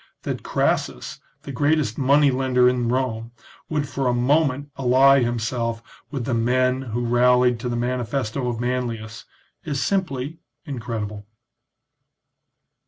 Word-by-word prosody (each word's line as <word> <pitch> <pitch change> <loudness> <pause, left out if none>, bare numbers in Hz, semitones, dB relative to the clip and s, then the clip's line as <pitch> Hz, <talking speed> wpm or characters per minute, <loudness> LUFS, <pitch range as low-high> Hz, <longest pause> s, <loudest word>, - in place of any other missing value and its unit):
That - - -3
Crassus, - - -1 0.2
the 140 - -7
greatest 145 -3 +1
money 140 +1 +4
lender 125 -1 +2
in 125 -2 +1
Rome, 120 -2 -2 0.4
would 150 -2 -1
for 135 -2 -2
a 125 - +2
moment 140 +2 +1
ally 135 +1 +5
himself 115 -1 -2 0.3
with 135 -5 -4
the 130 - -1
men 125 +3 +1
who 120 -1 -3
rallied 125 0 +3
to 125 - -3
the 120 - -2
manifesto 125 +1 -2
of 115 -2 -3
Manlius 120 -3 -3 0.4
is 150 -5 -3
simply 160 -6 -2 0.3
incredible. 110 -7 -5
125 Hz, 125 wpm, -23 LUFS, 120-135 Hz, 0.4 s, ally